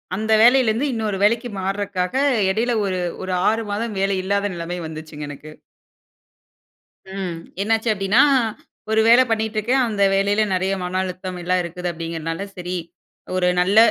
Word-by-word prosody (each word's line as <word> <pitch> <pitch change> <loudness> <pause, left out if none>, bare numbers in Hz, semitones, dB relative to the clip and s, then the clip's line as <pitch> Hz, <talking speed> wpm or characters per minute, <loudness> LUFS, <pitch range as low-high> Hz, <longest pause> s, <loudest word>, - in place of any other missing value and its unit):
அந்த 220 +2 0
வேலையிலிருந்து 245 +1 +4
இன்னொரு 215 -3 -2
வேலைக்கு 235 +3 +2
மாறக்காக 190 -1 -2 0.4
இடையில 235 +5 0
ஒரு 185 -2 -1 0.2
ஒரு 185 - -3 0.2
6 225 +1 0
மாதம் 215 +1 -3
வேலை 195 0 +1
இல்லாத 200 +1 0
நெலைமை 175 +1 -5
வந்துச்சுங்க 155 -1 -8
எனக்கு. 150 +2 -10 1.6
ம். 190 -3 -4 0.3
என்னாச்சு 225 +2 +1
அப்படீன்னா, 195 +5 +3 0.7
ஒரு 220 0 +4
வேலை 240 +3 +7
பண்ணிட்டுருக்கேன். 220 +3 +1
அந்த 205 -3 0
வேலையில 200 +2 +2
நெறைய 190 +1 0
மன 180 +1 -3
அழுத்தம், 185 0 -5
எல்லாம் 180 +1 +1
இருக்குது 175 +1 -4
அப்படிங்கிறதனால, 165 +1 -4
"சரி! 180 0 -4 0.6
ஒரு 180 -1 +2
நல்ல 190 +4 +2
195 Hz, 140 wpm, -21 LUFS, 180-220 Hz, 1.6 s, வேலை